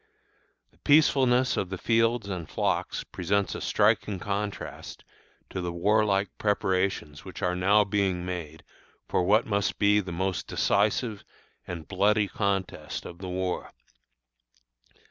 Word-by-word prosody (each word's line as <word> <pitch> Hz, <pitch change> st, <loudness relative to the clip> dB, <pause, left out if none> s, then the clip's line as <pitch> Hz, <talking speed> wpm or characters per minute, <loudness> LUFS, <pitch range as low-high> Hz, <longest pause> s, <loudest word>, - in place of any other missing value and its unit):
The -, -, -30 dB
peacefulness 130 Hz, -4 st, +4 dB
of 95 Hz, -, -1 dB
the 95 Hz, -, -4 dB
fields 115 Hz, +1 st, +1 dB
and 90 Hz, -5 st, -5 dB
flocks -, -, -1 dB
presents 100 Hz, +3 st, -1 dB
a -, -, -6 dB
striking 100 Hz, -2 st, +2 dB
contrast 100 Hz, +2 st, -5 dB, 0.5 s
to 95 Hz, -, -3 dB
the 90 Hz, -1 st, -3 dB
warlike 100 Hz, +2 st, +2 dB
preparations 95 Hz, -6 st, 0 dB
which 95 Hz, +1 st, -8 dB
are 90 Hz, 0 st, +1 dB
now 100 Hz, +4 st, +4 dB
being 95 Hz, -3 st, 0 dB
made 85 Hz, -4 st, -6 dB, 0.4 s
for 90 Hz, -, +1 dB
what 105 Hz, +5 st, +3 dB
must 100 Hz, -2 st, 0 dB
be 105 Hz, 0 st, +4 dB
the 95 Hz, -3 st, -4 dB
most 95 Hz, +2 st, -2 dB
decisive 105 Hz, +1 st, +1 dB, 0.4 s
and 85 Hz, -3 st, -6 dB
bloody 105 Hz, +2 st, +2 dB
contest 95 Hz, -7 st, -2 dB
of 85 Hz, -, -9 dB
the 95 Hz, -1 st, -6 dB
war. 90 Hz, 0 st, -3 dB
100 Hz, 130 wpm, -27 LUFS, 90-105 Hz, 0.5 s, peacefulness